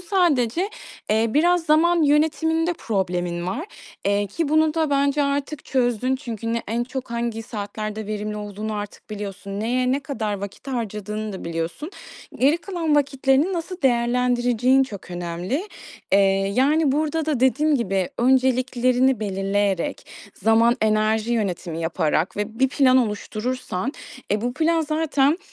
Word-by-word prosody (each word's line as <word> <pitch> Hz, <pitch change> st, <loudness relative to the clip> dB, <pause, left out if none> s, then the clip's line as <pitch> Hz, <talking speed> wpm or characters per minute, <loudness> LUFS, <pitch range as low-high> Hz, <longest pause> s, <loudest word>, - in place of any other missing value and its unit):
Sadece, 350 Hz, -, +1 dB, 0.4 s
eee, 220 Hz, +1 st, +3 dB
biraz 335 Hz, +7 st, +3 dB
zaman 330 Hz, +2 st, +4 dB
yönetiminde 320 Hz, +3 st, +2 dB
problemin 180 Hz, -, -2 dB
var, 260 Hz, -, -3 dB, 0.4 s
eee, 200 Hz, 0 st, +2 dB
ki 290 Hz, -, -2 dB
bunu 315 Hz, 0 st, +3 dB
da 320 Hz, -2 st, +1 dB
bence 280 Hz, +1 st, +2 dB
artık 280 Hz, +1 st, -2 dB
çözdün. 255 Hz, 0 st, +1 dB
Çünkü 230 Hz, -4 st, -4 dB
ne 235 Hz, -, -1 dB
en 235 Hz, +2 st, 0 dB
çok 260 Hz, 0 st, -6 dB
hangi 235 Hz, -1 st, -2 dB
saatlerde 215 Hz, 0 st, -5 dB
verimli 210 Hz, 0 st, -3 dB
olduğunu 210 Hz, +1 st, -5 dB
artık 205 Hz, +1 st, -7 dB
biliyorsun. 200 Hz, -1 st, -6 dB
Neye 250 Hz, +3 st, +1 dB
ne 275 Hz, -, 0 dB
kadar 240 Hz, -7 st, -3 dB
vakit 200 Hz, +6 st, -7 dB
harcadığını 215 Hz, -3 st, -4 dB
da 190 Hz, -, -7 dB
biliyorsun. 170 Hz, -, -4 dB, 0.5 s
Geri 280 Hz, +5 st, +4 dB
kalan 335 Hz, -4 st, -1 dB
vakitlerini 275 Hz, +3 st, +2 dB
nasıl 355 Hz, +1 st, -5 dB
değerlendireceğin 245 Hz, 0 st, +3 dB
çok 205 Hz, -8 st, -7 dB
önemli. 175 Hz, -, -3 dB, 0.4 s
Eee, 195 Hz, -, +6 dB, 0.4 s
yani, 285 Hz, +3 st, +3 dB
burada 310 Hz, +2 st, 0 dB
da 295 Hz, -6 st, 0 dB
dediğim 290 Hz, +4 st, +3 dB
gibi 195 Hz, -6 st, 0 dB
önceliklerini 255 Hz, 0 st, +2 dB
belirleyerek, 195 Hz, -2 st, -1 dB, 0.3 s
zaman 225 Hz, +3 st, +3 dB
enerji 215 Hz, +1 st, +2 dB
yönetimi 180 Hz, -7 st, -2 dB
yaparak 165 Hz, +1 st, 0 dB
ve 215 Hz, +2 st, -4 dB
bir 265 Hz, 0 st, +4 dB
plan 260 Hz, -1 st, +4 dB
oluşturursan, 235 Hz, 0 st, -2 dB, 0.4 s
e, 210 Hz, -, +1 dB
bu 245 Hz, +2 st, -2 dB
plan 325 Hz, +3 st, +2 dB
zaten 310 Hz, -1 st, +1 dB
245 Hz, 135 wpm, -23 LUFS, 210-285 Hz, 0.5 s, Eee